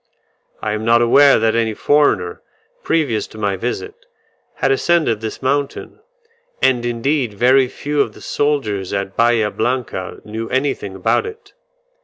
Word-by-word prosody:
I 110 - -1
am 105 +1 -3
not 115 +1 +4
aware 140 +4 +6
that 110 0 +1
any 115 -2 0
foreigner, 145 -13 +1 0.4
previous 125 -10 0
to - - -14
my 100 -2 -1
visit, 125 - -4 0.6
had - - +1
ascended 170 - +1
this 110 +3 -6
mountain; 140 - -2 0.6
and 125 -2 +2
indeed 120 -1 -1
very 130 +4 +4
few 145 +3 -2
of - - -2
the - - -15
soldiers 110 -11 -1
at 100 -1 -3
Bahia 115 -2 +2
Blanca 120 -8 -3
knew 110 +1 -5
anything 130 -7 -2
about 95 - +1
it. 445 +1 -11
120 Hz, 145 wpm, -18 LUFS, 105-140 Hz, 0.6 s, aware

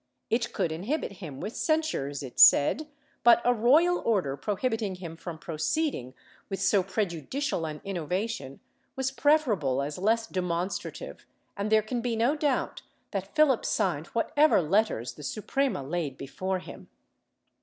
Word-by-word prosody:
It 235 +1 +1
could 165 - -1
inhibit 200 - -2
him 145 -7 -7
with 215 - -5
censures 310 - -1
it 130 - -8
said, 295 - +6 0.4
but 235 -1 +7
a 245 - +5
royal 300 +10 +4
order 185 -12 0
prohibiting 210 - -2
him 170 -3 -8
from 165 0 -7
proceeding 155 - -2 0.3
with 195 - -3
so 200 - +3
pre 195 +3 -1
judicial 175 - -3
an 150 -1 -7
innovation 180 -5 -3 0.3
was 265 0 -1
preferable 245 - +2
as 145 +4 -5
less 225 +4 +2
demonstrative, 185 - -4 0.3
and 205 +1 -3
there 215 -1 +5
can 235 +3 -3
be 235 -1 -1
no 235 +6 +2
doubt 295 -3 -1 0.3
that 195 +2 -5
Philip 305 -6 +4
signed - - 0
whatever 305 0 +3
letters 175 - +1
the - - -12
Suprema 220 - -1
laid 145 -2 -3
before 185 +7 -3
him. 180 - -11
200 Hz, 145 wpm, -28 LUFS, 160-250 Hz, 0.4 s, but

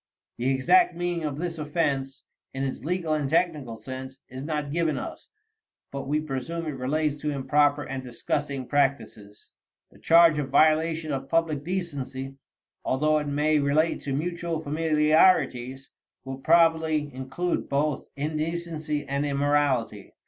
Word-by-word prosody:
The 125 +2 +1
exact 240 - +4
meaning 175 -1 -2
of 145 -2 -3
this 165 0 -4
offense, 145 -3 -1 0.3
in 135 - -2
its 135 -1 -4
legal 170 0 -1
and 150 -3 -1
technical 150 -8 0
sense, 130 +2 -8
is 130 +1 -7
not 150 -2 -3
given 165 -1 0
us, - - -7 0.6
but 140 -1 -5
we 150 +2 +1
presume 155 +3 -4
it - - -3
relates 145 +3 -1
to 150 +1 -3
improper 145 +1 +2
and 135 -1 -5
disgusting 135 +2 -3
practices. 130 -7 -2 0.4
The - - -19
charge 165 -2 +6
of 140 -2 -3
"violation 155 +2 +3
of 135 -1 -4
public 160 -4 +1
decency," 145 -7 -4 0.5
although 155 +3 +2
it 150 - -4
may 150 +2 +2
relate 145 +3 +1
to 140 - -3
mutual 170 +2 -2
familiarities, 150 -4 +2 0.3
will 135 0 -6
probably 160 -2 +3
include 135 +7 -3
both 145 0 0
indecency 155 0 -3
and 140 +1 -1
immorality. 140 -7 0
150 Hz, 140 wpm, -26 LUFS, 135-160 Hz, 0.6 s, charge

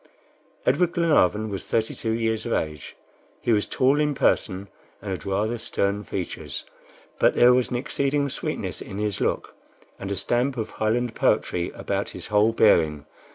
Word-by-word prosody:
Edward 170 +7 +2
Glenarvan 110 - +2
was 95 -2 -5
thirty 110 -1 0
two 115 - -4
years 115 0 -1
of 115 - -1
age. 75 -3 -3 0.4
He 120 - 0
was 105 -2 +2
tall 135 +3 +2
in 150 -1 +1
person, 100 -6 +1 0.3
and 100 -1 -6
had 95 +1 -5
rather 105 +4 0
stern 100 -1 -1
features; 90 -3 -5 0.5
but - - +4
there 125 +1 +7
was 125 -1 +2
an - - -3
exceeding 140 +2 0
sweetness 140 - -3
in 95 - -7
his 105 -1 -2
look, - - -1 0.5
and 100 - -5
a 100 - -1
stamp 125 +6 0
of 110 - -3
Highland 115 +2 0
poetry 85 -5 +1
about - - -2
his - - -8
whole 105 +2 +3
bearing. 80 -10 +3
110 Hz, 165 wpm, -25 LUFS, 100-125 Hz, 0.5 s, there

